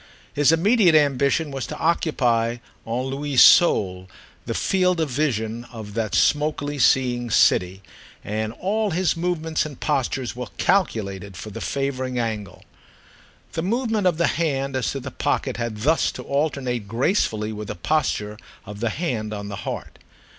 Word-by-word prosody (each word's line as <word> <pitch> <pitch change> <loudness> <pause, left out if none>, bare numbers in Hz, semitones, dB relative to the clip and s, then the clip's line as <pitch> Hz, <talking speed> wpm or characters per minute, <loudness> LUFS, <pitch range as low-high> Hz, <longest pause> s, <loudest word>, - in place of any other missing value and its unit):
His 145 +1 +4
immediate 180 +1 +4
ambition 145 +1 +2
was 135 -2 -4
to - - -6
occupy 120 -8 +1 0.3
à 120 +3 -2
lui 140 +1 -3
seul 95 - +5 0.4
the - - -2
field 180 -2 +1
of 155 -4 -1
vision 120 -5 -1
of 110 -4 -9
that 110 -2 -2
smokily 145 -1 +1
seeing 120 -1 +2
city, 95 -2 +3 0.4
and 110 +1 -3
all 210 - -1
his 180 -1 +1
movements 165 -2 -1
and 145 -4 -8
postures 135 -4 -1
were 125 -1 -5
calculated 100 - 0
for 105 +3 -8
the - - -7
favouring 130 -2 -2
angle. 110 -6 -4 0.9
The 160 - -2
movement 220 +1 0
of 175 - +1
the 170 - +2
hand 140 -5 -1
as 130 - 0
to 135 - -3
the 130 0 -7
pocket 135 -1 -1
had 120 -3 -3
thus 155 +7 +2
to - - -7
alternate 140 -6 -1
gracefully 110 - 0
with 105 0 -6
the - - -5
posture 105 - -1 0.3
of 105 +1 -9
the 115 +1 0
hand 110 -7 -3
on 100 0 -6
the 100 - -5
heart. - - -7
130 Hz, 155 wpm, -23 LUFS, 110-160 Hz, 0.9 s, seul